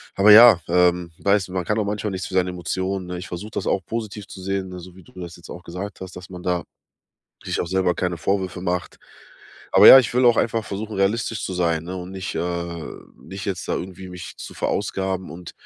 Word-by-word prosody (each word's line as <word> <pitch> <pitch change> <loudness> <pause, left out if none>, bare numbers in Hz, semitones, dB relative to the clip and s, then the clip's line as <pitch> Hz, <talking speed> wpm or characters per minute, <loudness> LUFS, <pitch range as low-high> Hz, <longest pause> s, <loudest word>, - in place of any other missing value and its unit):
aber 100 +2 +6
ja, 110 -3 +9
ähm, 90 0 +2
weißt 100 -1 +2
du, 90 - -11
man 90 -2 -2
kann 105 +5 0
auch 105 - 0
manchmal 105 0 -3
nichts 95 -1 -4
für - - -7
seine 90 -1 +2
Emotionen, 95 +2 -3
ne? 90 0 -5
Ich 90 - -7
versuche 95 +5 -7
das - - -3
auch 95 - 0
positiv 110 -3 -5
zu 95 - -10
sehen, 95 0 -3
ne, 90 0 -8
so 90 0 -12
wie 95 - -15
du - - -21
das 85 -2 -8
jetzt 85 - -15
auch 90 - -9
gesagt 95 +4 -7
hast, 95 -1 -8
dass 90 0 -10
man 90 -1 -9
da 90 -1 -1 0.8
sich - - -2
auch - - -2
selber 95 -1 +1
keine 90 +1 -2
Vorwürfe 95 +1 -2
macht. 90 -1 -3 0.7
Aber - - +9
ja, 135 - +12
ich 120 -3 0
will 125 +1 +3
auch 120 -1 +5
einfach 115 -1 0
versuchen, 105 +2 -5
realistisch 105 +2 0
zu - - -4
sein, 85 -3 0
ne, 90 +2 -6
und 90 0 -7
nicht, 95 -2 -5
äh 85 -1 -3 0.4
nicht 95 +1 -8
jetzt 95 -4 -4
da - - 0
irgendwie 95 0 -6
mich 90 -1 -9
zu - - -9
verausgaben 95 -2 -2
und 85 0 -9
95 Hz, 235 wpm, -22 LUFS, 90-100 Hz, 0.8 s, ja